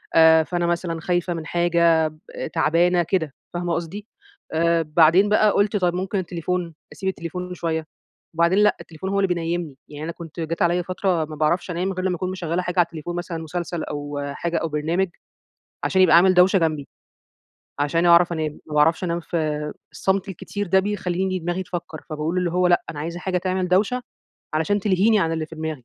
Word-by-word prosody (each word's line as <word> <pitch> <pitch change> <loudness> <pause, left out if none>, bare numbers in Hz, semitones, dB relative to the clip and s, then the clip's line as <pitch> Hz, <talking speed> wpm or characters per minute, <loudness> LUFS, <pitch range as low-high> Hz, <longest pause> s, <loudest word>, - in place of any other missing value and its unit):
آآ 160 0 +7
فأنا 175 +1 -2
مثلًا 170 -1 -2
خايفة 175 0 0
من 165 -2 -5
حاجة 170 -1 +3 0.4
ب - - -4
تعبانة 175 +3 +3
كده، 160 -4 -1 0.2
فاهمة 175 -1 -2
قصدي؟ 195 +6 -4 0.5
آآ 170 +1 +3
بعدين 165 +6 +4
بقى 210 0 +4
قُلت 205 +1 +1
طَب 180 -2 +1
ممكن 190 +2 -2
التليفون 175 -1 -3 0.2
أسيب 190 - -2
التليفون 180 +1 -5
شوية، 160 -2 -2 0.5
وبعدين 170 +4 +3
لأ، 210 0 +4
التليفون 165 +4 -7
هو 200 0 +1
اللي 195 - +3
بينيّمني، 170 -4 -2
يعني 150 +1 -8
أنا 165 - -3
كنت 170 0 -10
جات 165 +1 -3
عليّا 175 +1 +3
فترة 180 -2 -1
ما 155 0 -8
باعرفش 170 +4 0
أنام 185 +3 -1
غير 185 +1 -3
لما 180 -1 +1
أكون 185 +2 -3
مشغّلة 175 -1 -2
حاجة 180 0 -2
على 175 - +6
التليفون، 170 +1 -7
مثلًا 175 -1 -4
مسلسل 170 +1 -4
أو 145 -1 -5
حاجة 170 -1 -2
أو 165 - -1
برنامج، 165 +5 0 0.8
عشان 190 -1 +2
يبقى 170 -3 +6
عامل 185 +2 +6
دوشة 185 +1 +5
جنبي، 155 -4 -1 0.9
عشان 165 +4 +1
أعرف 170 0 +6
أنام، 155 -2 -3
ما 150 - -7
باعرفش 160 +4 +3
أنام 170 0 -1
في 150 -3 -2 0.2
الصمت 195 +1 0
الكتير 205 +2 -5
ده 190 +2 +4
بيخلّيني 190 -2 -1
دماغي 175 +2 -2
تفكر، 175 -4 -6
فباقول 155 +4 -2
اللي 180 -2 0
هو 180 0 +2
لأ، 175 -1 +3
أنا 145 - -8
عايزة 170 +3 -4
حاجة 185 -1 -1
تعمل 185 0 -1
دوشة 210 +7 +2 0.5
علشان 200 +6 +1
تلهيني 210 +3 +3
عن 165 -3 +1
اللي 160 -1 -2
في 160 - -11
دماغي، 155 -5 -5
175 Hz, 190 wpm, -23 LUFS, 160-185 Hz, 0.9 s, آآ